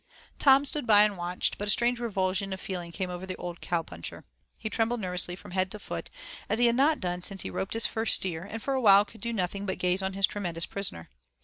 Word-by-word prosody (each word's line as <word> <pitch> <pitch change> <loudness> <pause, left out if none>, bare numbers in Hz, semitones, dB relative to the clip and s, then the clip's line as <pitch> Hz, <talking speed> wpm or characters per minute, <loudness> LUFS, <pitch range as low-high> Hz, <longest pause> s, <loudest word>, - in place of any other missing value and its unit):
Tom 275 0 +6
stood 290 -2 -2
by 210 -1 +7
and 210 -1 +1
watched, 175 0 -2
but 205 - -3
a - - -2
strange 240 +3 +3
revulsion 195 -3 -1
of 190 - -6
feeling 175 -3 -6
came 185 +1 -4
over 180 +1 -6
the 185 - -4
old 175 -1 -7
cow 170 -2 -1
puncher. 85 - -8 0.3
He 220 - -5
trembled 225 +2 0
nervously 180 -2 0
from 180 - -13
head 185 0 0
to 210 - -6
foot, - - -6 0.4
as 215 - +1
he 240 - +4
had 235 0 +3
not 295 +4 +3
done 180 -1 -3
since 195 +1 +1
he - - -5
roped 190 - -3
his 225 - +1
first 225 0 +5
steer, 170 -3 -3
and 215 +3 -7
for 275 - -1
a 265 - 0
while 200 -2 +7
could 220 -1 -15
do 235 - -2
nothing 200 -1 -2
but 190 - -2
gaze 180 +1 +1
on 190 0 -2
his 195 0 +4
tremendous 175 -5 -3
prisoner. 185 - -4
195 Hz, 250 wpm, -28 LUFS, 180-225 Hz, 0.4 s, by